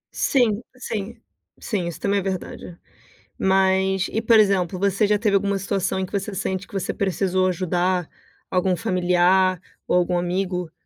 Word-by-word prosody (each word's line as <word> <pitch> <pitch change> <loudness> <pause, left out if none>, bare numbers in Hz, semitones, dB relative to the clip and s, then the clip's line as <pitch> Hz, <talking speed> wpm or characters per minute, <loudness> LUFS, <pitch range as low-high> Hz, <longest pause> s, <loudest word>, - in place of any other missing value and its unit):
Sim, 235 -5 +2 0.2
sim, 225 -2 -5 0.4
sim 190 -6 -2
isso 170 - -6
também 200 0 +1
é - - -2
verdade, 185 -2 -5 0.6
mas 190 0 +2
e 220 - -1
por 230 -1 +5
exemplo, 190 -3 +2
você 200 +2 +2
já 205 0 +2
teve 210 -3 +2
alguma 200 0 +1
situação, 195 -1 -1
em 190 - -1
que - - -15
você 200 0 -2
sente, 190 0 -3
que - - -20
você 195 -2 -2
precisou 185 -1 0
ajudar 180 0 0 0.4
algum 185 0 +1
familiar, 180 +1 +2 0.3
ou - - +2
algum 180 0 +1
amigo 180 -1 -2
190 Hz, 160 wpm, -23 LUFS, 180-200 Hz, 0.6 s, por